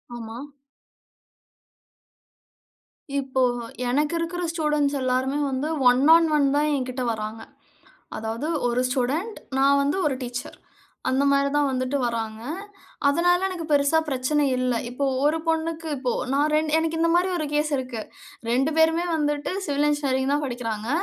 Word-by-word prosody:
ஆமா. 225 -1 -7 2.8
இப்போ, 265 -1 -1 0.5
எனக்கு 290 +5 +1
இருக்குற 350 +2 -3
ஸ்டூடண்ட்ஸ் 300 -3 0
எல்லாருமே 260 +2 0
வந்து, 265 +2 -2 0.2
1 250 +1 +3
ஆன் 330 -1 +5
1 285 -2 +3
தான் 300 +1 +2
என்கிட்ட 255 -1 -3
வர்றாங்க. 220 0 -4 0.8
அதாவது 225 +6 -3 0.2
1 245 +1 +1
ஸ்டூடண்ட். 280 - -1 0.2
நான் 280 +1 +4
வந்து 285 +5 0
1 285 -3 +1
டீச்சர். 245 0 -6 0.5
அந்த 260 +2 +2
மாதிரி 280 0 +3
தான் 290 -1 +3
வந்துட்டு 255 +2 -1
வர்றாங்க. 225 -2 -3 0.7
அதனால 355 +5 +3
எனக்கு 350 -3 -5
பெருசா 285 +2 +4
பிரச்சன 280 +3 +1
இல்ல. 250 0 0 0.2
இப்போ 250 +3 -2 0.2
1 305 +2 +3
பொண்ணுக்கு 325 0 -1
இப்போ 255 -2 -1 0.2
நான் 290 +2 +2
ரெண் 310 0 +2
எனக்கு 325 0 0
இந்த 335 0 +3
மாதிரி 360 +2 +3
ஒரு 310 - -2
கேஸ் 300 +1 +1
இருக்கு. 255 -4 -4 0.5
2 265 +6 +2
பேருமே 325 +2 +3
வந்துட்டு 295 -1 -1
சிவில் 290 0 +1
இன்ஜினியரிங் 275 -2 0
தான் 295 +1 0
படிக்கிறாங்க. 230 -3 -4
280 Hz, 140 wpm, -24 LUFS, 255-310 Hz, 2.8 s, ஆன்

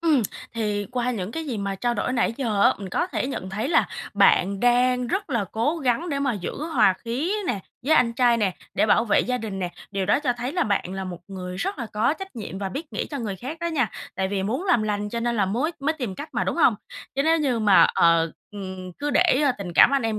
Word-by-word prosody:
Ừm. 310 -7 +3 0.3
Thì 210 -3 -1
qua 250 0 0
những 195 -5 -3
cái 325 -1 -4
gì 235 -6 -3
mà 200 -1 -2
trao 240 +4 -1
đổi 250 - -1
nãy 240 -2 +1
giờ 220 -7 0
á, - - +5
mình 195 -1 -6
có 350 - 0
thể 360 - -2
nhận 190 -8 -5
thấy 205 +3 -2
là 330 - +3 0.3
bạn 195 +1 +4
đang 250 0 +3
rất 390 - -2
là 235 -6 +1
cố 280 +9 0
gắng 280 +5 0
để 280 -2 -1
mà 275 -3 +1
giữ 195 -5 -4 0.2
hòa 190 - +5
khí 265 - -1
nè, 200 - -1 0.3
với 315 - +5
anh 235 -2 +4
trai 240 -1 +3
nè, 205 -4 +1 0.2
để - - +3
bảo 230 - +4
vệ 210 - +3
gia 250 0 -1
đình 210 -4 -5
nè, 180 -2 -2 0.2
điều 195 -2 -2
đó 215 - +3
cho 255 -5 +1
thấy 245 +3 -3
là 350 -1 +1
bạn 195 -3 -1
là 190 0 -4
một 180 -2 -6
người 185 -2 -6
rất 345 - -3
là 235 - -3
có 220 +8 +2
trách 385 -7 -8
nhiệm 195 -4 -6
và 195 -1 -3
biết 295 - -7
nghĩ - - -2
cho 285 - -4
người 205 -5 -3
khác 270 - -6
đó 340 - -1
nha, 275 - 0 0.2
tại 190 0 -1
vì 195 -1 -1
muốn 245 - -2
làm 355 - +3
lành 210 -1 -1
cho 235 +2 -3
nên 235 0 0
là 195 -2 +2
mới 260 - -1
mới 290 +3 +1
tìm 250 -11 -4
cách 290 +10 -7
mà, - - +1
đúng - - -2
hông? - - +5 0.4
Chứ 275 - +1
nếu 325 +2 +3
như 265 -6 +1
mà, 205 -3 +6
ờ, 165 -1 +4 0.2
ừm, 185 -3 -7
cứ 290 0 -1
để, 260 - +4
ơ, 275 - +4
tình 180 -3 -5
cảm - - +7
anh 275 - +2
em 220 -1 -1
230 Hz, 270 wpm, -24 LUFS, 195-275 Hz, 0.4 s, cảm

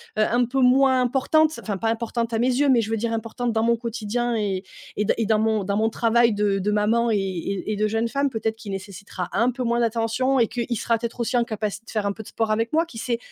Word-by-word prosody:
un 240 +3 +2
peu 265 +3 -2
moins 260 +1 +4
importante 300 +5 +2
enfin 205 -3 -3
pas 225 +4 -1
importante 230 +1 -2
à 225 - +1
mes 245 - +2
yeux, 280 +2 +2
mais 240 -3 +5
je 220 - -4
veux 225 - +1
dire 230 +1 -2
importante 230 +2 -2
dans 220 0 +1
mon 235 +1 +3
quotidien 235 +1 -2
et 195 -3 -1 0.3
et 210 - 0
dans - - +2
et 225 - 0
dans 215 0 +2
mon 220 -1 +1
dans 200 +1 -1
mon 220 +1 +2
travail 230 0 +3
de 205 -1 +1
de 205 +2 0
maman 225 +3 +2
et 210 - +2
et 195 +2 -3
et - - -2
de 215 +1 +1
jeune 225 +2 0
femme. 280 +3 0
Peut-être 220 -2 -2
qu'il 215 -3 -8
nécessitera 195 -2 -6
un 235 +5 +2
peu 250 +1 -4
moins 235 0 +1
d'attention 235 +3 +1
et 230 - +4
qu'il 235 0 -3
sera, 230 +2 +1
peut-être, 235 +1 -5
aussi, 235 +1 -1
en 240 - +3
capacité 215 -1 -4
de - - -9
faire 215 -2 -1
un 200 - 0
peu 220 - -9
de - - -15
sport 225 -1 -1
avec 225 +2 0
moi. 325 +2 +2
Qui 230 -9 -10
sait? 235 0 -1
225 Hz, 270 wpm, -23 LUFS, 210-240 Hz, 0.3 s, mais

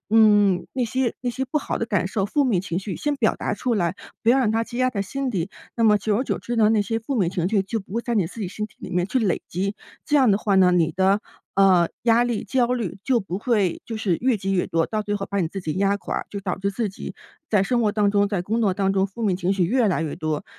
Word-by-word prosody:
嗯， 205 -5 +5
那 255 - 0
些 255 +1 -1
那 245 - 0
些 265 +2 -3
不 305 - -3
好 - - -3
的 230 - -2
感 200 -5 0
受， 195 +1 -1
负 285 +7 +1
面 215 -9 +2
情 175 -2 -3
绪 195 -1 -5
先 295 -1 -1
表 - - +2
达 - - -2
出 250 - -2
来， 175 -3 0 0.3
不 - - 0
要 250 +3 +6
让 245 -5 +2
它 225 +1 +1
积 240 - -9
压 255 0 +2
在 205 - -3
心 265 +7 -3
底。 185 -4 -2 0.3
那 230 - +2
么 210 -1 +6
久 205 0 0
而 255 - -1
久 - - -2
之 240 - -4
呢， 215 -2 +5
那 220 -2 +3
些 225 +3 -2
负 230 +5 -4
面 185 -6 +1
情 180 -1 -1
绪 200 -2 +2
就 220 +3 -3
不 190 0 -11
会 235 - -1
在 240 - -2
你 200 -6 +2
自 225 - -9
己 190 - -2
身 210 +2 -4
体 215 - -25
里 - - -7
面 175 0 0
去 260 - 0
累 200 -6 +1
积。 195 +4 -2 0.3
这 295 - +2
样 260 -5 +5
的 195 - +4
话 205 -1 0
呢， 185 -1 +6
你 170 -2 +2
的， 190 +3 +2 0.3
呃， 185 -3 +5
压 235 +1 +4
力、 240 -3 -2
焦 255 -2 +1
虑 215 -6 -4
就 250 +3 +2
不 190 -2 -5
会 210 -6 0
就 225 - -4
是 195 -6 0
越 250 -2 +2
积 195 0 -2
越 180 -2 +1
多， 165 0 +1
到 215 -1 -2
最 205 0 -2
后 200 -1 -3
把 200 - -1
你 165 - 0
自 195 +2 -6
己 155 - -2
压 200 +1 +1
垮， - - -4
就 200 - -6
导 190 -2 -3
致 200 +1 -1
自 215 +2 -2
己 190 - -8 0.3
在 205 -3 +3
生 240 +4 +1
活 215 -3 +2
当 205 -1 +2
中、 205 0 +2
在 200 -4 -1
工 220 +5 -1
作 195 -4 +2
当 195 0 +1
中， 195 0 +2
负 200 +4 -9
面 200 -4 +2
情 185 0 0
绪 190 -2 +2
越 230 +5 +2
来 170 -3 0
越 155 - -3
多。 155 -1 -3
205 Hz, 315 characters per minute, -23 LUFS, 190-230 Hz, 0.3 s, 要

